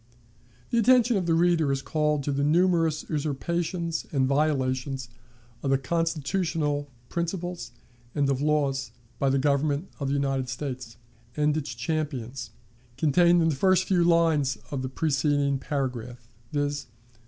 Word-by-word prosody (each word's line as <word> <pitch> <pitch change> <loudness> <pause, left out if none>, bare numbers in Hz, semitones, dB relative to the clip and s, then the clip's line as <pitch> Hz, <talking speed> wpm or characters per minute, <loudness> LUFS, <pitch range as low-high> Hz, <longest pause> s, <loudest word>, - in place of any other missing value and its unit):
The 235 - +3
attention 245 0 +5
of 185 -3 0
the 165 - +3
reader 165 -3 +3
is 135 0 -1
called 150 -2 0
to 145 - -1
the 140 0 0
numerous 165 0 +2
usurpations 165 +3 -2
and 135 -3 +2
violations 135 -3 0 0.5
of 135 -1 +1
constitutional 160 -1 -1 0.2
principles 170 -4 -3 0.5
and 145 -2 +2
of 135 -1 0
laws, 140 -3 +1 0.3
by 135 - +2
the 135 - +2
Government 145 +4 +1
of 140 - -2
the 140 - 0
United 135 -2 -1
States 125 -2 -5 0.4
and 150 0 +2
its 150 -5 -3
champions, 130 -3 -3 0.5
contained 170 +4 +4
in 165 - +3
the 185 +6 +3
few 180 -3 +3
lines 165 -5 +3
of 140 -2 -2
the 130 - -3
preceding 145 -1 +1
paragraph, 125 -5 -4 0.2
viz. 145 -1 -1
145 Hz, 135 wpm, -26 LUFS, 135-165 Hz, 0.5 s, attention